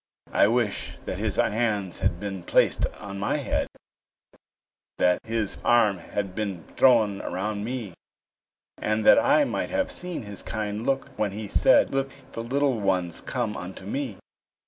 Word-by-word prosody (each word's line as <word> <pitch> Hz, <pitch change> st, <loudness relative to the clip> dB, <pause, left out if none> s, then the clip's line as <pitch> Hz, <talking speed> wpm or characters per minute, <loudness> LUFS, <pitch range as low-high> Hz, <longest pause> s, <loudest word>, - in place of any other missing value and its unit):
I -, -, +5 dB
wish 115 Hz, -2 st, 0 dB
that -, -, -4 dB
His -, -, -1 dB
hands 105 Hz, -4 st, 0 dB
had 95 Hz, -3 st, 0 dB
been 95 Hz, -2 st, -5 dB
placed 85 Hz, -, +2 dB
on 100 Hz, -1 st, -7 dB
my 100 Hz, -, 0 dB
head, -, -, -1 dB, 1.3 s
That 90 Hz, 0 st, +3 dB
His 115 Hz, -3 st, -2 dB
arm 110 Hz, -6 st, +4 dB
had 95 Hz, +2 st, -4 dB
been 100 Hz, -5 st, -3 dB
thrown 110 Hz, -6 st, +4 dB
around 105 Hz, +2 st, -3 dB
me, 115 Hz, -5 st, -4 dB, 0.9 s
And 110 Hz, 0 st, 0 dB
that -, -, +8 dB
I 290 Hz, +1 st, +4 dB
might -, -, -2 dB
have 285 Hz, -1 st, 0 dB
seen 180 Hz, -, -4 dB
His 100 Hz, -1 st, -7 dB
kind 105 Hz, +1 st, -4 dB
look 135 Hz, 0 st, 0 dB
when 105 Hz, -2 st, 0 dB
He 105 Hz, +1 st, -5 dB
said, -, -, +4 dB
"Let 135 Hz, 0 st, +1 dB, 0.2 s
the 115 Hz, -, -5 dB
little 135 Hz, +1 st, +1 dB
ones 90 Hz, -4 st, 0 dB
come 120 Hz, -4 st, -2 dB
unto 95 Hz, +1 st, -7 dB
me." 125 Hz, -1 st, -3 dB
105 Hz, 155 wpm, -26 LUFS, 100-120 Hz, 1.3 s, that